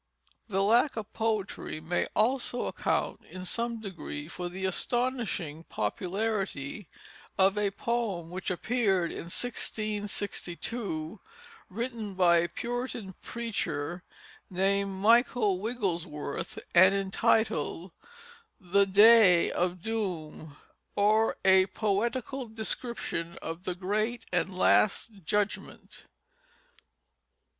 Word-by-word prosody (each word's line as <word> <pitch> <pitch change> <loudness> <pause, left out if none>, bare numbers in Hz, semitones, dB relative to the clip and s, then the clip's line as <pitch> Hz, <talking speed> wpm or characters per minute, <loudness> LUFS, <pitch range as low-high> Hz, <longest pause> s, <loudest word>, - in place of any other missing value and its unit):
The 195 -2 +1
lack 235 +6 +3
of 215 -1 -5
poetry 215 -7 -2
may 160 +3 -1
also 245 +2 +1
account - - -1
in 185 0 -7
some 230 +4 -1
degree 165 -7 -6
for 175 +1 -5
the 190 +2 -4
astonishing 210 - -1
popularity 190 - -3 0.5
of 195 +1 +4
a 210 -1 +1
poem 200 -6 -2
which 185 +1 -4
appeared 190 -2 +1
in - - -6
1662, 205 -3 -3 0.5
written 225 -1 -4
by 175 -2 +5
a 170 +1 +1
Puritan 240 -2 -4
preacher 175 -8 -3 0.5
named 195 +2 +1
Michael 210 0 +3
Wigglesworth, 180 -10 -3 0.2
and 185 +2 +7
entitled, 195 -3 +1 0.7
The 195 +1 +2
Day 200 -3 +7
of 180 0 -1
Doom; 170 -9 -4 0.4
or 215 +2 +3
a 190 0 +6
Poetical 235 +6 -1
description 220 -6 -3
of 165 +3 -6
the 180 - -2
Great 215 +6 -1
and 180 +2 +1
Last 205 +1 +2
Judgement. 205 +4 -2
200 Hz, 100 wpm, -29 LUFS, 180-225 Hz, 0.7 s, and